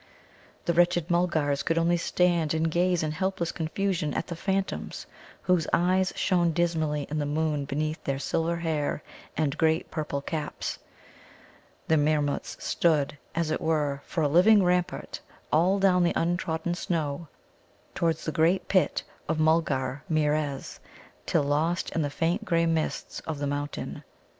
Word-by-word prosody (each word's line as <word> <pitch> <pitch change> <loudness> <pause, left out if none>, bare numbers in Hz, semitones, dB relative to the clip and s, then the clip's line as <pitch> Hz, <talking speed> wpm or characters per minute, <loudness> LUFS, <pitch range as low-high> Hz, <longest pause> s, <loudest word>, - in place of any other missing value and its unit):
The 170 - +2
wretched 175 0 +2
Mulgars 160 -5 +1
could 165 - 0
only 170 +1 +3
stand 170 -2 +1
and 160 0 +1
gaze 175 0 +2
in 155 - -1
helpless 180 +1 -1
confusion 170 -1 -1
at - - -1
the 170 - -6
phantoms, 195 +3 -2 0.4
whose 180 -4 +2
eyes 185 +2 +3
shone 175 -3 +2
dismally 160 -4 0
in 155 - -1
the 145 - -1
moon 150 -1 0
beneath 155 +3 -2
their 135 -1 -1
silver 165 +4 -1
hair 155 -3 -1 0.3
and 150 -3 +1
great 160 0 +2
purple 150 -3 -2
caps. 150 +1 -4 1.1
The 160 - +4
Meermuts 145 -1 0
stood, 150 -4 +1 0.2
as 165 -1 0
it - - -1
were, 150 -4 0
for 165 - -1
a - - +4
living 190 +7 +6
rampart 180 0 0 0.3
all 175 +6 +4
down 190 -2 +4
the 175 - +2
untrodden 170 0 -1
snow 165 -3 -2 0.7
towards 165 -1 0
the 155 - -1
great 165 +5 +2
Pit 185 -2 +2 0.3
of 160 - +1
Mulgarmeerez 150 -1 0 0.5
till - - +2
lost 155 +5 0
in 165 - 0
the 145 - 0
faint 170 +8 0
grey 170 -5 +2
mists 165 -1 -1
of 160 -2 -2
the 145 - -2
mountains. 145 +1 -4
160 Hz, 150 wpm, -27 LUFS, 150-175 Hz, 1.1 s, living